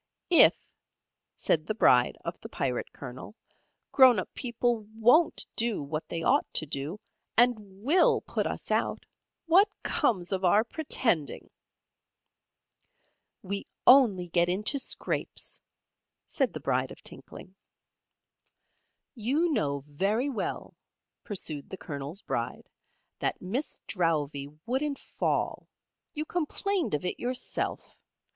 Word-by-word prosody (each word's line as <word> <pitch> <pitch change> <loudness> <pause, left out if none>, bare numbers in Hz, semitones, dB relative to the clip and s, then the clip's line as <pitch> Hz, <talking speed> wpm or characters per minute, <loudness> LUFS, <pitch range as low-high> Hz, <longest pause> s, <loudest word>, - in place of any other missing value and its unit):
"If," 340 - +8 0.8
said 155 -1 0
the 215 - -1
Bride 125 - +4
of - - -5
the - - -9
Pirate 125 -3 -2
Colonel, 130 - -9 0.6
"grown 260 -4 +7
up 185 - -4
people 240 -2 -1 0.2
WON'T 245 +9 +4
do 225 -8 0
what 155 +2 -5
they 165 -1 -3
ought 280 - +2
to 155 - +3
do, 145 +7 -5 0.4
and 215 -5 +2
WILL 375 - +4
put - - -2
us - - -5
out, - - 0 0.4
what 375 +5 +5
comes 180 -6 +1
of 190 -1 -1
our 195 +4 +5
pretending?" 225 - -1 1.9
"We 200 +1 -3 0.2
only 215 -10 +6
get 170 +1 +2
into 210 +10 +3
scrapes," 265 - -2 0.6
said - - 0
the - - -5
Bride - - 0
of - - -13
Tinkling. 185 - -8 1.6
"You 280 +8 0
know 140 - -1
very 200 - 0
well," 235 - -4 0.5
pursued 155 -9 -4
the 190 - -7
Colonel's 145 +4 -7
Bride, - - -4 0.5
"that - - -1
Miss 235 +11 -3
Drowvey 150 -6 -1 0.2
wouldn't 275 +4 -1
fall. - - -2 0.5
You 305 +1 -2
complained 355 - -1
of 150 - -4
it 180 - -3
yourself. 250 +1 -3
210 Hz, 120 wpm, -28 LUFS, 165-260 Hz, 1.9 s, If